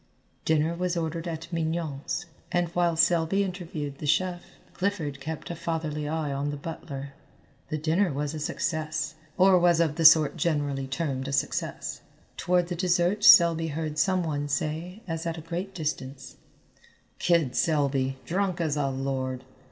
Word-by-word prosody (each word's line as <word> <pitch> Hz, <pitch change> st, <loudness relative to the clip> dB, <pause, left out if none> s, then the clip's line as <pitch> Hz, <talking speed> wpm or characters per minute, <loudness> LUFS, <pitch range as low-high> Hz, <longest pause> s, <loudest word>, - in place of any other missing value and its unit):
Dinner 160 Hz, +1 st, +2 dB
was 180 Hz, 0 st, -1 dB
ordered 165 Hz, +1 st, -3 dB
at 165 Hz, +1 st, -6 dB
Mignon's, 160 Hz, -1 st, -2 dB, 0.3 s
and 175 Hz, -1 st, +1 dB
while 175 Hz, -1 st, +1 dB
Selby 170 Hz, +3 st, +3 dB
interviewed 165 Hz, -7 st, -5 dB
the 150 Hz, -, -4 dB
chef, 180 Hz, +3 st, +1 dB, 0.3 s
Clifford 165 Hz, -8 st, -2 dB
kept 160 Hz, +4 st, -6 dB
a -, -, -4 dB
fatherly 155 Hz, -3 st, -3 dB
eye 155 Hz, -3 st, -2 dB
on 140 Hz, +1 st, -2 dB
the 145 Hz, -, -4 dB
butler. 140 Hz, -2 st, -7 dB, 0.6 s
The 155 Hz, -, -1 dB
dinner 165 Hz, +4 st, +1 dB
was 145 Hz, +2 st, -2 dB
a 155 Hz, -, -4 dB
success, 155 Hz, 0 st, -2 dB, 0.2 s
or 185 Hz, 0 st, +6 dB
was 175 Hz, -1 st, +4 dB
of 160 Hz, -2 st, +1 dB
the 165 Hz, -, +1 dB
sort 155 Hz, -1 st, +7 dB
generally 145 Hz, -4 st, 0 dB
termed 135 Hz, -2 st, -2 dB
a -, -, -3 dB
success. 135 Hz, -, -2 dB, 0.3 s
Toward 180 Hz, -1 st, +1 dB
the 175 Hz, -, -2 dB
dessert 180 Hz, +3 st, +1 dB
Selby 165 Hz, -3 st, +7 dB
heard 155 Hz, 0 st, -3 dB
some 185 Hz, 0 st, +2 dB
one 145 Hz, -3 st, -2 dB
say 165 Hz, +7 st, -3 dB
as 165 Hz, -1 st, -3 dB
at 165 Hz, 0 st, -3 dB
a -, -, -6 dB
great 180 Hz, +4 st, -5 dB
distance, 140 Hz, -4 st, -5 dB, 0.8 s
"Kid 165 Hz, -8 st, +2 dB
Selby, 140 Hz, -5 st, +1 dB
drunk 185 Hz, 0 st, -1 dB
as 155 Hz, -3 st, 0 dB
a 140 Hz, -2 st, +1 dB
lord." 130 Hz, -1 st, -3 dB
160 Hz, 160 wpm, -27 LUFS, 145-175 Hz, 0.8 s, sort